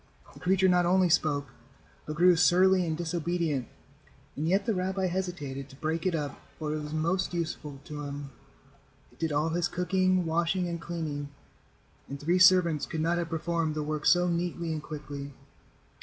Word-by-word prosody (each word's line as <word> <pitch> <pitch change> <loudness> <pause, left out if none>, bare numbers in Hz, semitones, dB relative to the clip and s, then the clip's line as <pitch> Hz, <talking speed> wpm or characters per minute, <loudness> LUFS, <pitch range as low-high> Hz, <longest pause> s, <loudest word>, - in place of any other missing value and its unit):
The - - -14
creature 190 +1 +3
not 180 -1 +3
only 185 0 +4
spoke, 145 -4 +1 0.6
but 155 - -4
grew 175 +2 +6
surly 180 +2 +4
and 160 -1 -1
disobedient, 170 -4 -1 0.7
and 155 +3 -2
yet 195 +3 +2
the 225 - +1
rabbi 190 0 -1
hesitated 170 -7 -3
to 135 - -13
break 160 +4 -2
it 180 - +1
up, 145 -3 -4 0.2
for 150 -1 -3
it 155 - -2
was 150 0 -6
most 170 +4 0
useful 155 -4 -4
to 150 -1 -7
him. 145 -1 -6 0.8
It - - -24
did 165 -1 -1
all 150 +2 +1
his 170 +1 0
cooking, 185 0 +1
washing 170 +3 0
and 170 -1 -4
cleaning, 155 -4 -4 0.8
and 140 +1 -6
three 170 +5 +1
servants 170 -6 +5
could 160 -2 -3
not 170 +2 +1
have 170 -1 -3
performed 165 -1 -1
the 155 - -1
work 150 0 -2
so 175 0 +5
neatly 170 -1 -2
and 155 - -4
quickly. 145 -2 -7
165 Hz, 175 wpm, -29 LUFS, 150-180 Hz, 0.8 s, grew